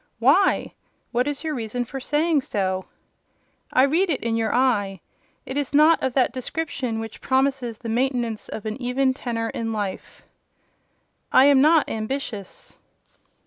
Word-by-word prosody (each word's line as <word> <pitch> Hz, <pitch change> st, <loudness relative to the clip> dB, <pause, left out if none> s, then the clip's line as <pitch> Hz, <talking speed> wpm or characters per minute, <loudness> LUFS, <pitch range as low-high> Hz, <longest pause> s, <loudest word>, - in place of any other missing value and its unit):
"Why? -, -, +3 dB, 0.4 s
What 245 Hz, +2 st, +1 dB
is 290 Hz, +1 st, -3 dB
your 315 Hz, -1 st, -2 dB
reason 245 Hz, -1 st, -3 dB
for 270 Hz, +3 st, -6 dB
saying 300 Hz, +3 st, +1 dB
so?" 190 Hz, -5 st, -2 dB, 0.9 s
"I 255 Hz, -, +4 dB
read 330 Hz, +7 st, +2 dB
it 285 Hz, -, -1 dB
in 230 Hz, -1 st, 0 dB
your 225 Hz, -1 st, 0 dB
eye; 210 Hz, -7 st, +1 dB, 0.5 s
it 260 Hz, -, -5 dB
is 285 Hz, -1 st, -2 dB
not 310 Hz, +2 st, +5 dB
of 260 Hz, -, -1 dB
that 260 Hz, -1 st, +2 dB
description 255 Hz, -3 st, -3 dB
which 225 Hz, -1 st, -7 dB
promises 265 Hz, -3 st, 0 dB
the 230 Hz, -, -9 dB
maintenance 235 Hz, -2 st, -1 dB
of 220 Hz, -, -7 dB
an 220 Hz, +4 st, -4 dB
even 260 Hz, +2 st, +1 dB
tenor 230 Hz, -3 st, -3 dB
in 225 Hz, -1 st, -3 dB
life." 205 Hz, -3 st, -5 dB, 1.1 s
"I 260 Hz, -, +7 dB
am 280 Hz, -2 st, +6 dB
not 310 Hz, +1 st, +5 dB
ambitious." 220 Hz, -3 st, -5 dB
250 Hz, 150 wpm, -23 LUFS, 225-275 Hz, 1.1 s, I